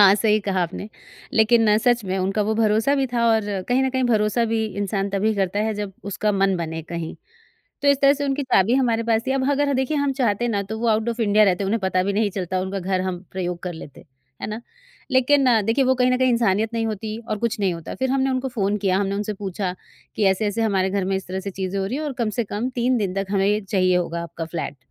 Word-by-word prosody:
हाँ, 195 -1 +8
सही 215 0 +2
कहा 195 -2 0
आपने, 175 +4 -5 0.4
लेकिन 220 -1 +4
सच 240 -1 +2
में 190 0 -2
उनका 195 +3 0
वो 215 +2 0
भरोसा 220 +4 +2
भी 275 -1 +1
था 235 -1 +2
और 220 0 +3 0.3
कहीं 250 +2 +3
न 265 - +1
कहीं 260 0 0
भरोसा 220 -1 +2
भी 220 -1 +1
इंसान 200 0 -1
तभी 205 +3 +1
करता 195 -1 -1
है, 215 +1 0
जब 205 -1 -4
उसका 210 +1 -1
मन 195 -1 +2
बने 160 -1 -4
कहीं। 165 0 -5 0.7
तो 285 - +3
इस 280 -1 +4
तरह 275 0 +6
से 285 0 -3
उनकी 280 +1 -1
चाबी 235 -3 +3
हमारे 235 -4 +2
पास 225 -1 +1
थी 265 - +1
अब 270 0 0
अगर 285 0 +1
देखिए 265 +3 0
हम 285 -1 +1
चाहते 235 -3 +1
हैं 240 - 0
ना 200 -3 0
तो 220 +3 -6
वो 235 - -1
आउट 220 +1 +1
ऑफ 235 0 -3
इंडिया 215 -1 +4
रहते, 195 0 +1
उन्हें 215 +4 0
पता 190 -1 +1
भी 200 +2 -1
नहीं 210 +1 +1
चलता 185 -1 -2
उनका 190 +1 -3
घर 185 +1 -1
हम 185 -1 -3
प्रयोग 180 -2 -3
कर 180 - -4
लेते। 160 -4 -11 0.4
है - - -2
ना? 215 +2 -5 0.5
लेकिन 270 +2 +4 0.2
देखिए 230 +6 +2
वो 260 0 +3
कहीं 250 0 +2
न 255 - +3
कहीं 255 0 +3
इंसानियत 225 -2 +1
नहीं 225 -1 0
होती 215 0 -4
और 215 - -1
कुछ 235 +1 -1
नहीं 195 -2 +2
होता 165 -1 -7
फिर 260 0 -1
हमने 270 0 +1
उनको 260 0 -1
फ़ोन 210 -5 -1
किया, 190 -2 +1
हमने 195 0 -1
उनसे 210 +1 -2
पूछा 190 -2 -4 0.4
कि, 215 - +1
"ऐसे-ऐसे 205 +3 +1
हमारे 190 -3 +1
घर 195 -1 -1
में 190 +1 0
इस 190 - -6
तरह 190 +1 -4
से 200 +1 -5
चीज़ें 190 0 -3
हो 195 - -1
रही 245 - -3
हैं 305 - -3
और 295 - -3
कम 225 -2 +1
से 235 - +2
कम 210 +4 -3
3 250 +2 +2
दिन 195 -4 -2
तक 195 0 -2
हमें 195 -1 +2
ये 210 +1 +2
चाहिए 185 -2 +1
होगा 170 -1 -2
आपका 170 0 -6
फ्लैट, 160 -3 -5
210 Hz, 260 wpm, -22 LUFS, 190-235 Hz, 0.7 s, हाँ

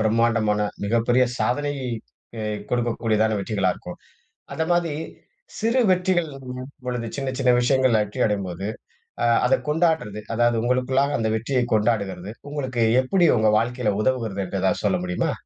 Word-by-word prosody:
பிரம்மாண்டமான 110 -1 +2 0.2
மிகப்பெரிய 115 +4 +3
சாதனை 145 +3 0 0.7
அ - - -3 0.3
கொடுக்கக்கூடியதான 115 -3 +1
வெற்றிகளா 100 -2 0
இருக்கும். 90 - -10 0.6
அந்தமாதிரி 165 -1 0 0.6
சிறு 230 +4 +2
வெற்றிகளின் 145 -8 -1 0.2
பொழுது 120 -2 -3
சின்ன 135 -1 -2
சின்ன 125 - +2
விஷயங்கள்ல 130 -3 +3
வெற்றி 105 +5 -5
அடையும்போது, 95 -2 -3 0.6
அ - - +3 0.2
அத 130 - +2
கொண்டாடுறது 155 - 0
அதாவது 120 0 +2
உங்களுக்குள்ளாக 130 +3 +1
அந்த 110 -1 0
வெற்றியை 125 +2 0
கொண்டாடுகிறது, 105 -3 0 0.2
உங்களுக்கு 130 -5 -1 0.2
எப்படி 175 +7 +2
உங்க 110 0 +4
வாழ்க்கையில 120 -2 0
உதவுகிறது 115 -6 -1
என்று - - -3
எதாவது - - 0
சொல்ல - - +2
முடியுமா? 90 0 -1
120 Hz, 130 wpm, -23 LUFS, 110-135 Hz, 0.7 s, உங்க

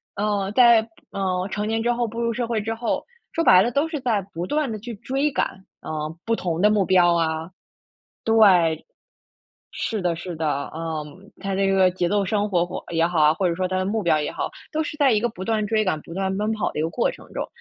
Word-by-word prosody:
呃， 205 -1 -1
在 235 -1 +6
步 225 - -16 0.2
呃， 185 -1 -1
成 210 0 -2
年 225 0 0
之 240 - +1
后 240 -1 0
步 230 +2 -5
入 235 0 +1
社 240 +1 -2
会 230 -2 -1
之 225 +2 -3
后， 230 +1 -2 0.3
说 330 - 0
白 185 -6 +7
了 240 - 0
都 285 +6 +1
是 315 -2 -4
在 225 -6 +1
不 170 +2 -3
断 295 +1 -1
地 215 - -4
去 230 +3 -7
追 270 +7 -1
赶， 190 -5 -2 0.2
嗯， 155 +1 -4
不 230 - +1
同 175 -5 -2
的 210 - +6
目 210 -2 +2
标 175 -1 +4
啊。 160 0 -1 0.7
对， 185 -8 +4 0.9
是 220 -3 -3
的 175 -2 0
是 175 +1 -6
的， 150 -3 -2
嗯。 160 +3 -6
它 195 -1 -2
这 195 0 +1
个 190 -1 +4
节 180 -1 -1
奏 205 +1 +1
生 205 +2 0
活 175 -3 +2
活 - - -6
也 165 0 +3
好 170 -2 0
啊， 150 0 +6
或 190 - 0
者 170 - 0
说 185 +1 -1
它 185 - -2
的 185 - 0
目 215 +3 -1
标 165 -4 +3
也 150 - -2
好， - - -3 0.2
都 315 0 0
是 300 - -5
在 280 -2 +4
一 210 - +2
个 240 - +1
不 185 -5 -9
断 215 0 0
追 215 +1 +1
赶、 170 -5 0
不 - - -12
断 190 0 -1
奔 210 +1 0
跑 210 -5 -1
的 - - -6
一 155 - +1
个 160 - 0
过 240 - +1
程 - - -13
中。 - - -3
195 Hz, 265 characters per minute, -23 LUFS, 175-225 Hz, 0.9 s, 白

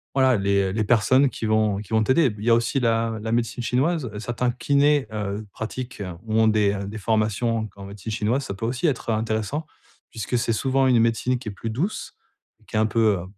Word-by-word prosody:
voilà, 130 -3 +4
les 100 -1 +1
les 110 +1 0
personnes 120 +5 +4
qui 115 - -6
vont 110 -2 +2
qui 105 0 -8
vont 110 0 +4
t'aider. 130 +1 +3
Il 105 - -8
y - - +3
a - - +7
aussi 120 +4 0
la 115 -2 +1
la 110 +1 -3
médecine 120 +1 -1
chinoise. 135 +3 0
Certains 120 +2 -1
kinés, 140 +1 +2
heu, 105 0 -3
pratiquent 120 0 -6 0.2
ou 110 -1 -3
ont 110 - +4
des 105 -2 +3
des 105 +2 -6
formations 110 +2 0
en 110 - -2
q - - -20
en 100 - -8
médecine 100 +2 -7
chinoise, 115 +5 0
ça - - -4
peut 115 +3 -4
aussi 125 +7 -2
être 130 -5 -2
intéressant, 110 +7 -1 0.5
puisque 115 +2 -2
c'est 115 -1 0
souvent 135 +3 +1
une 125 -2 +4
médecine 115 +2 +1
qui 120 - -6
est - - -5
plus 105 +3 -6
douce, 150 - -3 0.5
et - - -26
qui - - -9
est - - +3
un 110 - +3
peu, 110 -2 +2
heu, - - -6
115 Hz, 230 wpm, -24 LUFS, 110-125 Hz, 0.5 s, a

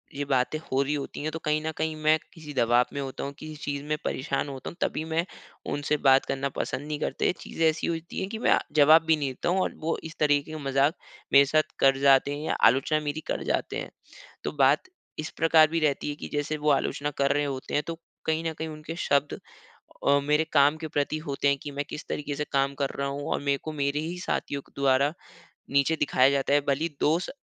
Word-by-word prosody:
ये 145 +1 -2
बातें 135 +2 +1
हो 135 -3 -1
रही 140 +2 0
होती 145 -1 -4
है 155 - -1
तो 160 - -5
कहीं 150 0 +1
न 160 - -1
कहीं 160 0 -1
मैं 155 +1 +5 0.2
किसी 155 -4 -10
दबाव 120 -1 +3
में 140 - -3
होता 135 -1 -5
हूँ। 140 - -4
किसी 155 0 -8
चीज़ 140 -1 -3
में 150 +1 -1
परेशान 140 +1 -2
होता 135 -2 -6
हूँ - - -12
तभी 155 - 0
मैं 165 +1 0 0.5
उनसे 145 +1 0
बात 135 -1 +4
करना 135 +1 -2
पसंद 145 +2 -4
नहीं 150 -1 -3
करते। - - 0
चीज़ें 165 - -2
ऐसी 160 0 -2
होती 165 0 -4
है 190 - -2
कि 220 +3 -5
मैं - - +4 0.2
जवाब 155 +2 +7
भी 160 - +4
नहीं 140 -2 -1
देता 130 +6 -3
हूँ। 185 - +2
और - - -1
वो 160 +1 -1
इस 160 +1 -8
तरीक़े 145 0 +2
का 155 - -5
मज़ाक 135 +3 +3 0.4
मेरे 140 0 +8
साथ 155 +2 +1
कर 135 0 +5
जाते 140 0 +5
हैं 150 +2 -6
या - - 0 0.2
आलोचना 135 +5 +1
मेरी 155 +2 -4
कर - - -2
जाते - - -1
हैं। - - -5 0.5
तो - - -2
बात - - +5 0.4
इस 155 - -3
प्रकार 160 -1 +6
भी 165 +2 -1
रहती 150 -1 0
है 145 - -3
कि - - -7
जैसे 150 +1 -1
वो 150 0 0
आलोचना 145 +1 0
कर 140 0 +2
रहे 145 0 +1
होते 135 -2 -5
हैं 145 - +2
तो 165 0 -5 0.3
कहीं 160 +1 0
न - - -5
कहीं 160 0 -5
उनके 155 +1 -7
शब्द 140 -3 0 0.7
अ, 140 0 +5
मेरे 150 +2 +2
काम 145 +1 +5
के 160 0 -5
प्रति 145 +1 -1
होते 140 0 0
है 140 - +4
की 145 - -5
मैं 145 +1 -3
किस 150 - -7
तरीक़े 145 -1 -3
से 150 - -2
काम 135 0 +2
कर 135 - 0
रहा 140 - 0
हूँ। 140 +1 -4
और - - +1
मेरे 140 -1 +1
को 155 - -4
मेरे 140 +1 +1
ही 170 +3 -4
साथियों 140 -5 -2
के - - -32
द्वारा 140 +2 +3 0.6
नीचे 140 +3 +3
दिखाया 135 -3 +3
जाता 140 0 0
है 145 - +5
भले 140 +3 +1
ही 170 - -1
दोस्त 165 +4 +1
145 Hz, 240 wpm, -27 LUFS, 140-155 Hz, 0.7 s, मेरे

